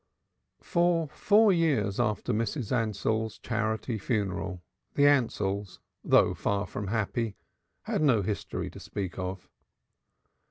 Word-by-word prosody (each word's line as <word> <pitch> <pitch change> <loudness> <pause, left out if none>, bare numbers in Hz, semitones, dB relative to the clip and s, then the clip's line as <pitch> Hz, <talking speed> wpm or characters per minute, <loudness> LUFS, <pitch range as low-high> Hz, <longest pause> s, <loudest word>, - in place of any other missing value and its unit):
For 170 -2 +2
four 210 +6 +4
years 150 - +1
after 105 -4 0
Mrs. 115 +2 -2
Ansell's 110 -1 0
charity 110 0 -2
funeral 95 -4 -2 0.3
the 145 - +3
Ansells, 105 -8 +1 0.3
though - - +4
far 100 0 -1
from 105 -1 -5
happy, 110 +1 -1 0.5
had - - -1
no 125 -9 +4
history 105 +1 -3
to - - -11
speak 95 -2 -5
of. 95 0 -5
110 Hz, 115 wpm, -29 LUFS, 100-130 Hz, 0.5 s, four